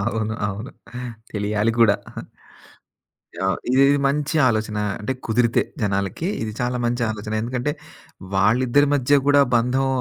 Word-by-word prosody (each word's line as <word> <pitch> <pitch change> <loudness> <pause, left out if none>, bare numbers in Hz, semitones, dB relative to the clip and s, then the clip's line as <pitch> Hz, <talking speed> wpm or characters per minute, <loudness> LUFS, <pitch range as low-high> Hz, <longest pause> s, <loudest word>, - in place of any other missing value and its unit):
అవును. 110 0 -1
అవును. 105 +7 -6 0.6
తెలియాలి 105 +1 0
కూడా. 105 -3 +5 1.5
ఆ! - - +2 0.2
ఇది 130 +1 +4
ఇది 145 0 +3
మంచి 150 +2 -1
ఆలోచన. 110 -1 -1 0.2
అంటే, 110 +5 -2
కుదిరితే 115 +1 +2 0.2
జనాలకి, 100 - -1
ఇది 110 - -4
చాలా 125 0 -1
మంచి 120 +1 -1
ఆలోచన. 105 0 -6
ఎందుకంటే, 125 +4 -2 0.6
వాళ్ళిద్దరి 125 +8 +3
మధ్య 140 +1 +3
కూడా 145 0 +6
బంధం 125 +3 +1
120 Hz, 125 wpm, -22 LUFS, 105-130 Hz, 1.5 s, కూడా